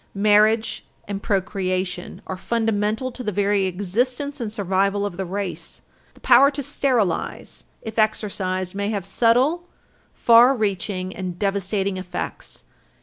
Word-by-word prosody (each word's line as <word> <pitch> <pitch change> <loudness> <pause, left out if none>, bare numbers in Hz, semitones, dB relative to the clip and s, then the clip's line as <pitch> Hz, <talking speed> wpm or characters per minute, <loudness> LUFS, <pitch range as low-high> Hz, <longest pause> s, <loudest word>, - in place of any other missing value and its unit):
Marriage 215 +2 +3 0.2
and 200 -1 -4
procreation 185 -3 -2
are 190 - -4
fundamental 220 +3 -1
to 250 +1 -8
the 210 - -1
very 200 0 +1
existence 245 +10 -2
and 220 -3 -3
survival 200 0 0
of 200 -4 -4
the 190 0 -4
race. 195 0 -5 0.3
The - - -20
power 260 +2 +6
to 285 0 -4
sterilize, 245 -9 -1 0.2
if 220 0 -4
exercised, 190 -4 -1
may 200 +1 -2
have 200 -4 -3
subtle, 250 - +2 0.4
far 240 +3 +6
reaching 195 -3 -2
and 185 -2 -5
devastating 195 0 -1
effects. 185 -1 -6
205 Hz, 130 wpm, -22 LUFS, 190-230 Hz, 0.4 s, power